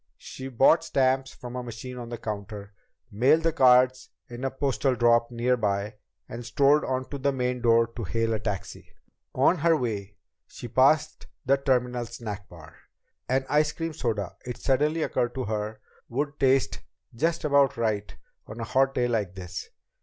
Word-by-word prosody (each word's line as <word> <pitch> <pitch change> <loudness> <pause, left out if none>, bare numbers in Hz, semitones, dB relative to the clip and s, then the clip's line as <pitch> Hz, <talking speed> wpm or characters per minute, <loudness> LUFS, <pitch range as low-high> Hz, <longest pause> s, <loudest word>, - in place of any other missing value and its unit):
She 130 - -8
bought 135 +6 +4
stamps 135 0 +1
from 125 -1 -9
a 125 - -3
machine 125 +1 -8
on 120 -1 -7
the 120 - -5
counter, 100 -2 -6 0.4
mailed 130 +10 +3
the 165 -1 +1
cards 130 -2 +4 0.2
in 120 +1 -8
a 135 - +1
postal 135 -1 0
drop 120 0 +3
nearby, 110 -4 -1 0.3
and 120 +1 -7
strolled 140 +5 +3
on 130 0 -2
to 140 - -5
the 140 +1 +1
main 125 -1 -2
door 115 -1 +4
to 115 +1 -8
hail 115 +3 -1
a 110 - -1
taxi. 105 -2 -5 0.5
On 150 +7 +3
her 165 +1 +3
way, 105 -6 -4 0.3
she 120 - -9
passed 140 +6 +2 0.2
the 135 +1 +4
terminal 125 -3 0
snack 105 -4 -7
bar. 80 -4 -14 0.5
An 130 +1 +1
ice 150 +1 +2
cream 165 -1 -4
soda, 110 - -3
it 125 -1 -6
suddenly 150 +4 +1
occurred 120 -3 -1
to 130 - -2
her, 105 0 -3 0.3
would 145 +4 -3
taste 135 -1 +2 0.3
just 160 +8 -1
about 140 -4 +3
right 105 -3 -2 0.3
on 110 +2 -9
a - - -3
hot 135 +3 +1
day 125 -1 +2
like 105 -6 -1
this. 90 -2 -7
125 Hz, 170 wpm, -26 LUFS, 115-135 Hz, 0.5 s, bought